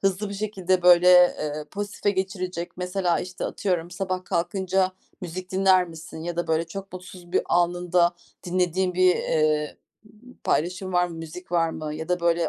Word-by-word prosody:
hızlı 195 +1 0
bir 200 - -6
şekilde, 190 -3 -1
böyle, 180 0 +7
eee, 155 -4 +4
pozitife 205 0 -2
geçirecek? 185 -2 -3
Mesela, 180 -1 0
işte, 180 0 -6
atıyorum, 175 -4 -2
sabah 185 0 -3
kalkınca 185 +2 0 0.3
müzik 180 +1 -6
dinler 185 -2 +4
misin 160 0 -10
ya 170 0 -4
da 175 - -1
böyle 160 +1 0
çok 195 +3 -8
mutsuz 180 -1 -11
bir - - +3
anında 175 0 +2 0.3
dinlediğin 180 0 0
bir, 185 0 +4
eee, 155 -1 0 0.3
b 220 +4 -18
paylaşım 185 +4 -1
var 180 0 +3
mı, 170 - -8
müzik 165 +2 -9
var 165 -1 +2
mı 155 -1 -5
ya 160 +2 -6
da, 180 0 0
böyle, 170 0 +2
180 Hz, 170 wpm, -25 LUFS, 170-185 Hz, 0.3 s, böyle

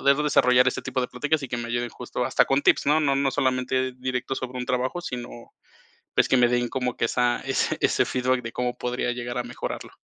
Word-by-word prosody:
de 140 - +5
desarrollar 125 -3 +4
este - - -3
tipo 130 0 -2
de 125 - -2
pláticas 150 +4 -1
y 135 - -5
que 120 - -3
me 120 0 -5
ayuden 120 0 -2
justo - - -4
hasta - - +3
con 135 +1 +2
tips, - - +3
¿no? 150 +2 +4
No, 140 -3 +2
no 135 0 +1
solamente 130 -1 0
directo 130 +1 -3
sobre 130 -1 -5
un 125 - -3
trabajo, 130 +7 -1
sino 125 -7 -5 0.9
pues - - +3
que 130 - +4
me 125 -1 +5
den 120 0 +1
como 125 -2 -2
que - - 0
esa 120 +1 +1
ese 135 0 0
ese - - +3
feedback 130 0 0
de 115 - -5
cómo 125 +1 -2
podría 125 0 -2
llegar 120 0 -4
a - - -1
mejorarlo. 120 +1 -6
125 Hz, 230 wpm, -25 LUFS, 125-130 Hz, 0.9 s, de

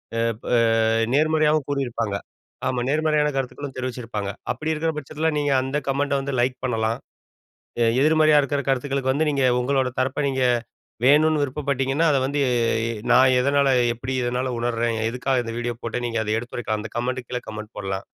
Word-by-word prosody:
ப் 115 0 0
பா - - -6 0.6
நேர்மறையாகவும் 155 0 +3
கூறியிருப்பாங்க. 120 -7 -2 0.5
ஆமா, 125 - -1
நேர்மறையான 150 0 +2
கருத்துக்களும் 135 +1 -4
தெரிவிச்சிருப்பாங்க. 120 -5 -4 0.2
அப்படி 155 +1 -3
இருக்கிற 160 +1 -1
பட்சத்தில 155 +2 -2
நீங்க 145 -1 0
அந்த 135 +3 -2
கமெண்டை 140 +1 0
வந்து 140 0 -4
லைக் 125 +1 +1
பண்ணலாம், 115 -1 -1 1.0
எதிர்மறையா 155 0 +5
இருக்கிற 140 +1 -1
கருத்துக்களுக்கு 135 0 0
வந்து 150 +2 +1
நீங்க 140 -2 0 0.2
உங்களோட 130 +1 +1
தரப்ப 130 +3 0
நீங்க 130 -1 -1 0.6
வேணுண்னு 150 +1 +4
விருப்பப்பட்டீங்கன்னா, 140 +2 0
அதை 135 - +2
வந்து 140 +1 0 0.7
நான் 130 +1 +6
எதனால 140 +1 +2 0.3
எப்படி 130 +3 -5
இதனால் 125 +1 -1
உணருறேன், 115 -1 -1
எதுக்காக 125 +1 0
இந்த 115 0 -5
வீடியோ 120 0 -3
போட்டேன் 120 +1 -2
நீங்க 115 -1 -1
அத 105 - -1
எடுத்துரைக்கலாம். 115 -2 -4
அந்த 110 - -7
கமெண்ட் 125 0 -2
கீழ 125 - -2
கமெண்ட் 110 0 -8
போடலாம். 95 -1 -4
130 Hz, 150 wpm, -23 LUFS, 120-145 Hz, 1.0 s, நான்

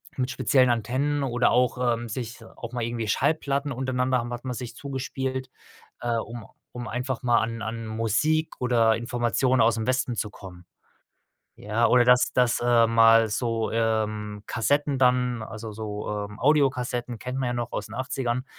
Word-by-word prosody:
mit 130 0 -1
speziellen 130 -1 +3
Antennen 130 +6 0
oder 120 -2 +2
auch, 125 +1 +2 0.2
ähm 120 +1 -6
sich, 115 +1 -6
auch 120 +1 -9
mal 125 -1 -3
irgendwie 115 -2 -3
Schallplatten 140 +1 0
untereinander 130 0 0
haben 120 +1 -5
hat 120 +2 -7
man 125 - -2
sich 120 -1 -6
zugespielt, 130 -1 -4 0.5
äh, 120 -1 -1
um 115 0 -6 0.3
um 125 -1 -6
einfach 125 +1 -3
mal 120 -1 +4
an 115 0 -3
an 115 +2 -4
Musik 115 +9 0
oder 115 -3 +3
Informationen 120 +2 0
ausm 110 -1 +2
Westen 130 -1 0
zu 105 0 -2
kommen. 90 -3 -12 0.9
Ja, 110 +3 0
oder 125 -1 +5
dass 125 0 +5
dass, 125 -2 +2
äh, 120 -1 +4
mal 115 0 +6
so, 115 0 -1
ähm, 110 -2 -1
Kassetten 140 +5 +1
dann, 125 -2 +2
also 110 0 -7
so, 105 -1 -5
ähm, 105 0 -5
Audiokassetten 125 -5 +1
kennt 125 +1 -5
man 130 -2 -1
ja 120 - -1
noch 120 -1 -3
aus - - -3
den - - -11
Achtzigern, 130 -1 -2
120 Hz, 170 wpm, -25 LUFS, 115-130 Hz, 0.9 s, mal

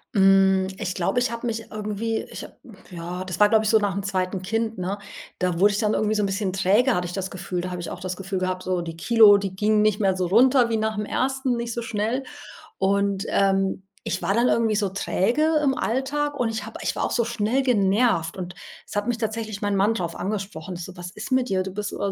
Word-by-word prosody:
Hm, 190 -1 +5
ich 185 -3 -3
glaube, 185 +7 0
ich 245 -1 0
habe 235 +1 -5
mich 225 -1 -3
irgendwie 215 +1 -3
ich - - -7
habe - - -12 0.4
ja, 175 +1 -5
das 185 0 -5
war, 210 - +6
glaube 220 0 +3
ich, - - +2
so 220 - +6
nach 205 -2 0
dem 200 +1 -3
2. 185 -1 -2
Kind, 225 +3 -2
ne? 190 +3 -3 0.4
Da 180 -2 0
wurde 205 +1 +5
ich 200 - -1
dann 210 -1 +1
irgendwie 215 0 +1
so 210 - +1
'n - - +2
bisschen 195 -1 -2
träge, 205 +7 +3
hatte 180 - -1
ich 175 - -7
das 190 -1 -3
Gefühl. 180 -1 -4
Da 180 +1 -5
habe 180 -1 -4
ich - - -5
auch - - -7
das 185 -1 -4
Gefühl 195 0 -4
gehabt 185 0 -2
so 185 -1 -1
die 165 -1 -6
Kilo, 210 +3 +6
die 195 -2 -4
gingen 210 +2 +2
nicht 215 -1 +2
mehr 195 -3 +2
so 185 -1 -1
runter 245 +5 +5
wie 225 - +1
nach 220 0 -1
dem 210 - -2
1., 265 +2 0
nicht 235 -1 -3
so 235 - -3
schnell. 225 +4 -2 0.5
Und, 200 +1 +1
ähm, 195 -1 +1 0.2
ich 185 - -3
war 195 - +1
dann 235 +3 +3
irgendwie 225 -3 +2
so 205 -2 +1
träge 245 - +1
im 270 -3 +1
Alltag 285 +4 -1
und 245 - +2
ich 220 -1 -4
habe - - -9
ich - - -2
war - - -1
auch - - -1
so 235 - +1
schnell 235 +2 0
genervt 200 -7 +2
und 180 -1 -6 0.3
es - - -10
hat 205 - 0
mich 240 -1 0
tatsächlich 220 -2 -4
mein 205 -1 0
Mann 200 +3 +3
drauf 170 -4 -3
angesprochen. 190 -3 -4
So: 180 +2 -8
„Was 175 0 -8
ist 215 +7 -5
mit 255 -1 +2
dir? 185 -1 +1
Du 190 - -6
bist 205 +2 -4
immer 200 - -2
205 Hz, 250 wpm, -24 LUFS, 185-225 Hz, 0.5 s, war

